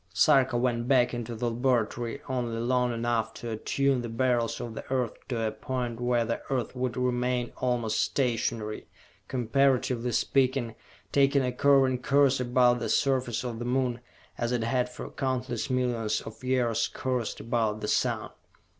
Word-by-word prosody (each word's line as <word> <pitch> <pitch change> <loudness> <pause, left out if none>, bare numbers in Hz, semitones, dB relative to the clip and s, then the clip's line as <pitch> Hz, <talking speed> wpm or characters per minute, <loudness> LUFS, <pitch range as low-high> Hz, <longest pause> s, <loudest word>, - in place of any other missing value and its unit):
Sarka 130 -2 +4
went 120 -1 0
back 125 -3 +3
into 120 -1 -4
the 120 +1 -1
laboratory 120 0 -1
only 120 -3 -2
long 125 +1 +1
enough 115 -1 -1
to 120 - -6
attune 135 +4 0
the 120 - -5
Beryls 120 0 0
of 115 - -5
the - - -6
Earth 125 -4 0
to 115 -4 -1
a 110 - 0
point 120 +1 -4
where 120 -1 +2
the 115 +1 -2
Earth 130 -3 -2
would 125 -1 -2
remain 125 -1 0
almost 120 -3 0
stationary, 115 -4 -1 0.4
comparatively 125 -1 +1
speaking, 130 -1 +1 0.4
taking 140 0 +3
a 125 - 0
curving 135 -1 +3
course 140 -1 +3
about 125 0 +3
the - - -3
surface 130 -4 +1
of 120 -3 -4
the 120 - -4
Moon, 125 -1 0 0.4
as 120 0 -1
it 120 -2 0
had 125 +2 0
for 125 - -8
countless 130 -3 -2
millions 120 -4 0
of 110 +3 -11
years 125 -3 +1
coursed 125 -3 -3
about 110 -2 -1
the 105 - -3
Sun. - - 0
125 Hz, 160 wpm, -28 LUFS, 115-130 Hz, 0.4 s, Sarka